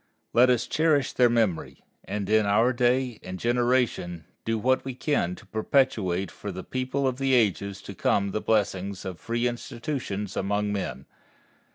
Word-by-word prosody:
Let 125 +2 +6
us 120 -1 +2
cherish 155 -3 +2
their 125 -1 +4
memory, 110 -9 0 0.2
and 100 -2 -3
in 110 0 +3
our 115 +5 +3
day 125 -1 +1
and 90 0 -6
generation 120 - 0 0.2
do 115 0 0
what 130 +4 +2
we 130 -2 -5
can 125 - 0
to - - -15
perpetuate 105 -6 +1
for 100 - -6
the 95 0 -6
people 130 +2 -1
in 130 - +1
the 135 -1 +2
ages 100 -3 +1
to 100 - -8
come 100 +1 +1
the 110 - -2
blessings 100 -3 0
of 90 -3 -6
free 120 +1 -1
institutions 120 -4 -4
among 105 +1 0
men. 70 -10 -4
110 Hz, 165 wpm, -26 LUFS, 100-125 Hz, 0.2 s, Let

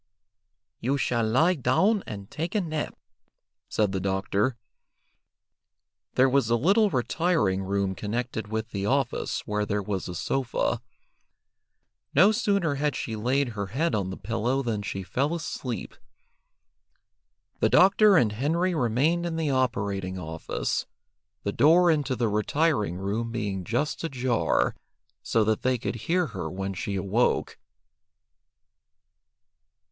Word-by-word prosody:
"You 135 +4 0
shall 120 -3 0
lie 160 +10 +4
down 190 - +2
and 100 -2 -8
take 165 +6 -4
a 210 - +3
nap," 155 -4 -4 0.7
said 105 -3 +1
the 95 - -1
doctor. 100 +5 0 1.6
There 130 - +5
was 130 -3 +2
a 120 - +4
little 200 - +3
retiring 125 - +1
room 100 0 -1
connected 110 +2 -3
with 110 +1 -4
the 100 0 -2
office 135 0 0
where 105 -1 -1
there 105 -1 -1
was 95 -2 -3
a 90 - -5
sofa. 130 +6 -1 1.3
No 190 +9 +7
sooner 200 -7 +1
had 150 -1 +1
she 110 - -3
laid 125 +5 +1
her 100 -3 -4
head 150 - -1
on 100 -3 0
the 95 - -6
pillow 115 +6 -1
than 110 -4 -2
she 95 -2 -4
fell 140 - -1
asleep. 130 -7 -5 1.6
The - - +3
doctor 195 +1 +6
and 115 -8 +3
Henry 165 - 0
remained 155 +6 +1
in 165 - -3
the 160 -3 0
operating 100 -8 -1
office, 80 -2 -3 0.6
the 100 - -1
door 170 +3 +5
into 145 -4 0
the 120 -2 0
retiring 105 - +1
room 105 +5 -2
being 100 -5 -3
just 125 - -2
ajar, 130 -6 +1 0.5
so 115 - +2
that 110 0 0
they 130 0 +1
could - - -3
hear 180 +1 +2
her 90 -5 -4
when 95 +2 -4
she 100 +2 -4
awoke. 100 +5 0
120 Hz, 135 wpm, -26 LUFS, 100-150 Hz, 1.6 s, No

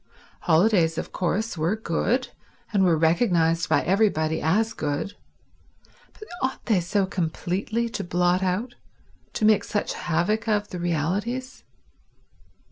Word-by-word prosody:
Holidays, 165 -1 +3
of - - -4
course, 195 +5 -1
were 165 +7 +1
good, 220 +5 -1 0.4
and 200 -2 +3
were 170 -3 +4
recognized 165 -1 +2
by - - +3
everybody 170 -5 +1
as 215 +8 +1
good, 150 +6 -3 1.0
but 430 - -12
ought 260 0 -2
they 215 -6 +3
so 190 +3 0
completely 190 +6 -2
to 210 -3 -4
blot 175 +1 +1
out, 190 +7 -1 0.6
to 215 - 0
make 215 -1 +4
such 205 - -2
havoc 185 +7 -1
of, 210 -1 0
the 180 - -6
realities? 190 - -2
185 Hz, 125 wpm, -25 LUFS, 170-220 Hz, 1.0 s, were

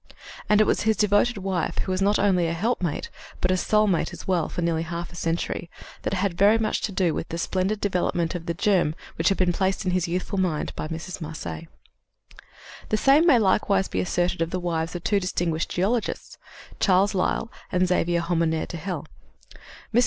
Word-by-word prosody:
And 210 0 +5
it - - +7
was - - +1
his 220 0 +2
devoted 210 +3 +3
wife 190 -3 -2
who 190 - -2
was 185 +1 -1
not 205 +2 +3
only 185 -4 +2
a 165 - -1
helpmate 180 -3 -1 0.3
but 180 - +1
a - - +3
soulmate 210 -2 +2
as - - -10
well 180 -4 +1
for 175 - -3
nearly 165 -1 +1
half 170 +1 -5
a - - -12
century, 165 0 -2 0.3
that - - -2
had 190 -1 0
very 205 +5 +5
much 220 -1 -1
to 210 - -2
do 185 -4 +1
with - - -4
the 165 - -4
splendid 190 +4 -1
development 175 -4 0
of 175 -1 -6
the 170 - -1
germ 175 -4 +2 0.2
which 165 - +2
had 195 - +1
been 180 -1 +2
placed 190 +2 0
in 185 - +1
his 180 -1 0
youthful 185 +3 -2
mind 175 -5 -1
by - - -4
Mrs. 170 +3 -6
Marcet. 150 - -6 1.2
The 215 - +2
same 280 +8 +5
may 280 -7 +7
likewise 195 -2 +2
be - - -3
asserted 180 -1 0
of 165 - +1
the 185 - -2
wives 165 -1 -2
of 175 - -5
two 205 -2 +2
distinguished 175 -3 -1
geologists 215 +6 -2 0.4
Charles 195 +1 +3
Lyell 195 +4 0 0.2
and 180 0 +2
Xavier 175 -1 +1
Hommaire 165 -2 0
de 170 - -6
Hell. 175 -1 -4 0.9
Mrs. 235 - +5
180 Hz, 200 wpm, -25 LUFS, 170-200 Hz, 1.2 s, it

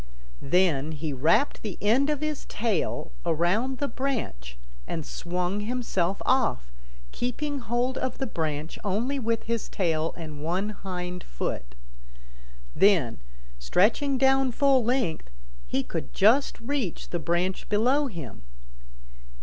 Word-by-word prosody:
Then 160 -2 +2
he 150 0 -3
wrapped 160 - +2
the 210 -5 -5
end 245 +8 +3
of 300 -1 0
his 305 -2 -3
tail 205 -8 -1
around 175 +11 +1
the 285 - -1
branch 225 - -3 0.3
and 160 -3 -3
swung 180 +3 -2
himself 210 -5 -1
off, 235 - +2 0.4
keeping 280 +4 -2
hold 245 +2 -1
of 260 -1 -2
the 270 - -1
branch 160 - -3
only 230 +8 0
with 230 -2 0
his 230 -1 -2
tail 165 -4 0
and 155 -3 -7
one 185 +6 0
hind 180 -3 -5
foot. - - -4 1.0
Then, 170 - +4 0.4
stretching 220 - +2
down 270 0 +4
full 270 -1 +4
length, 230 - 0 0.4
he 135 - 0
could 165 +2 -5
just 230 +8 +4
reach 240 - -3
the 175 - -1
branch 175 +4 -1
below 255 +8 +3
him. 155 - -8
200 Hz, 125 wpm, -27 LUFS, 165-255 Hz, 1.0 s, Then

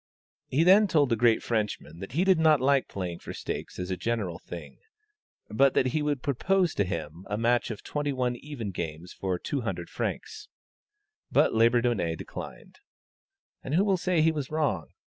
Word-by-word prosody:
He 145 +5 +2
then 195 +4 +6
told 150 -7 +3
the 115 - +3
great 115 0 +3
Frenchman 105 -8 -2
that 95 +4 -8
he 165 +6 +2
did 190 -3 +4
not 155 -2 +5
like 135 +1 +3
playing 90 -3 -5
for - - -8
stakes - - -5
as 90 0 -4
a - - 0
general 100 -3 -2
thing, 85 - -9 0.7
but 135 +4 +3
that - - +3
he 155 +4 0
would 145 -3 -1
propose 180 +6 +1
to 100 - +1
him 85 -1 -5
a 105 - -1
match 120 +2 +2
of 110 - -6
twenty 145 -1 -2
one 125 -2 -1
even 125 -7 -6
games 80 0 -6
for 95 -2 -2
200 120 +4 -4
francs; - - -4 0.8
but - - +4
Labourdonnais 115 -6 +2
declined. - - -9 0.8
And 135 - -2
who 190 +4 +4
will 195 -2 +3
say 175 -2 +1
he 160 - +4
was 150 -4 -4
wrong? 155 -3 0
120 Hz, 180 wpm, -28 LUFS, 100-150 Hz, 0.8 s, then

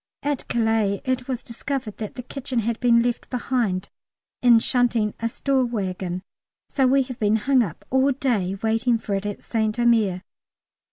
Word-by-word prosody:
At 290 -2 -2
Calais 220 -4 +1
it 255 0 -1
was 255 -3 -3
discovered 235 -2 -4
that 215 -2 -6
the 250 - -6
kitchen 260 0 -5
had 230 0 0
been 235 -1 +4
left 240 -1 -2
behind, 235 -7 -1 0.5
in 240 -2 +7
shunting 230 -2 +1
a 230 - -1
store 270 +2 +1
waggon, 185 -6 -3 0.4
so 270 -2 +2
we 270 +1 +4
have 255 -2 -8
been 210 0 +3
hung 255 +4 +3
up 190 -10 -4
all 265 +2 +4
day 220 -8 0
waiting 225 +2 +2
for 215 -2 -5
it 195 +1 -1
at 205 - -6
St 220 -1 -1
Omer. 220 -6 +2
235 Hz, 170 wpm, -23 LUFS, 210-255 Hz, 0.5 s, in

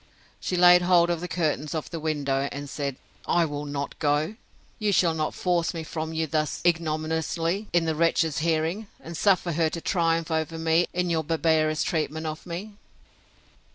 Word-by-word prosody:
She 185 - -2
laid 180 0 +7
hold 175 -1 +4
of 170 -1 -2
the 180 - -3
curtains 155 -3 -1
of 155 - -4
the 165 - -4
window, 140 -3 -1
and 145 0 -6
said, 140 -1 -3 0.3
I 170 -1 +3
will 145 -1 -5
not 145 0 -4
go! 150 +6 +1 0.4
You 210 -1 +1
shall 175 -3 +3
not 155 -1 -2
force 175 -1 0
me 165 - -4
from 160 0 -4
you 160 0 -1
thus 155 0 -1
ignominiously 165 +3 0
in 170 -1 +2
the 160 - +1
wretch's 160 -1 +1
hearing, 165 +6 0
and 165 +1 -8
suffer 180 0 +2
her 165 0 +1
to 170 - -5
triumph 165 -1 0
over 160 0 -1
me 165 +1 +2
in 180 -1 -1
your 160 -1 +1
barbarous 160 -1 +1
treatment 160 -2 -2
of 155 +3 -5
me. 200 +5 -6
160 Hz, 180 wpm, -26 LUFS, 155-175 Hz, 0.4 s, laid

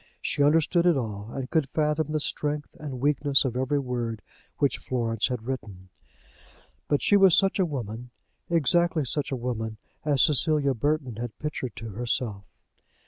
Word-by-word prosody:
She - - -1
understood 165 +4 +4
it 170 -5 +4
all, 105 -4 -4
and 135 0 -4
could 155 -5 +1
fathom 150 0 0
the 155 - 0
strength 150 0 -2
and 140 -4 -6
weakness 145 0 +3
of 125 -2 -2
every 130 +3 0
word 120 -5 -3 0.3
which 140 - +1
Florence 115 -3 -1
had 125 -3 -4
written. 105 -8 -6 1.0
But 145 - +1
she 205 - +4
was 195 -4 +6
such 195 +1 +2
a 185 - +3
woman, 120 -4 -5 0.4
exactly 170 0 +2
such 145 +3 -2
a - - 0
woman, 115 -3 -3 0.3
as 145 -3 +3
Cecilia 150 -1 +3
Burton 135 -2 -1
had 120 -1 -5
pictured 150 -6 -4
to 115 - -7
herself. 110 -1 -2
135 Hz, 160 wpm, -26 LUFS, 120-150 Hz, 1.0 s, was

